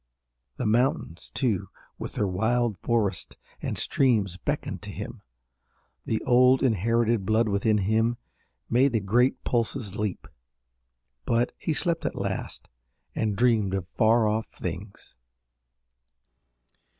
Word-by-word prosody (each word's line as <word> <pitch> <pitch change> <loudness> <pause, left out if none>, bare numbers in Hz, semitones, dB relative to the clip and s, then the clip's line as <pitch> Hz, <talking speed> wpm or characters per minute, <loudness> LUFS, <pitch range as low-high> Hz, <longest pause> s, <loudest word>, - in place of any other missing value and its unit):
The 125 - -2
mountains, 110 -6 0
too, 100 -7 -1 0.3
with - - -5
their 105 - 0
wild 110 +3 0
forests 105 -6 -1 0.2
and - - -3
streams 110 -9 +2
beckoned 90 - -3
to - - -7
him. - - -7 0.9
The 110 - -1
old, 125 +1 +5
inherited 115 -1 +2
blood 110 +3 +2
within 105 +1 +2
him 110 +4 +1 0.5
made 130 +2 +3
the 115 - +3
great 120 +6 +2
pulses 115 -4 -2
leap. 105 -10 -3 1.0
But 120 +1 +1
he 160 - -1
slept 170 -1 0
at - - -2
last - - -4 0.5
and 105 -2 -1
dreamed 110 -4 +2
of 95 -2 -3
far 110 +1 +3
off 110 +1 0
things. 95 +4 -7
110 Hz, 120 wpm, -26 LUFS, 100-120 Hz, 1.0 s, old